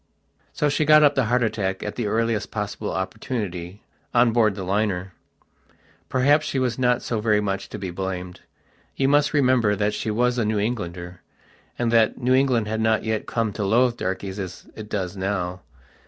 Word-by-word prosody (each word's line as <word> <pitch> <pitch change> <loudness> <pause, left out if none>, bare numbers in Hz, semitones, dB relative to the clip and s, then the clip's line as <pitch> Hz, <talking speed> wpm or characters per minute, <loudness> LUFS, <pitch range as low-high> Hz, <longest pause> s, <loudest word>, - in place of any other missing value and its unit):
So 150 - 0
she 145 +2 +1
got 155 0 +6
up 145 - +5
the 135 - +1
heart 120 +2 +2
attack, 95 -4 -2
at 105 - -5
the 120 -4 -2
earliest 115 0 0
possible 105 0 -4
opportunity, 95 -2 -4 0.3
on 120 -1 +5
board 110 -4 +3
the 95 - -5
liner. 95 -1 -1 1.0
Perhaps 145 +4 +3
she - - -2
was 125 -2 0
not 125 -1 +2
so 115 -3 -2
very 105 -1 +3
much 100 -1 -3
to - - -6
be 95 -3 -5
blamed. 90 -1 -5 0.6
You 135 - +1
must 145 +1 +3
remember 125 -7 +3
that 105 +1 0
she 110 - -3
was 120 +3 +1
a - - +2
New 110 0 0
Englander, 90 -5 -4 0.6
and 120 -1 0
that 115 -2 +3
New 125 0 +1
England 130 -5 +2
had 110 +1 -2
not 110 0 +2
yet 110 -1 -2
come 115 -3 -1
to 105 - -3
loathe 120 +4 +3
darkies 95 0 -4
as 95 -3 -7
it 105 -1 -9
does 95 -3 -3
now. 95 -2 -3
110 Hz, 185 wpm, -23 LUFS, 95-125 Hz, 1.0 s, got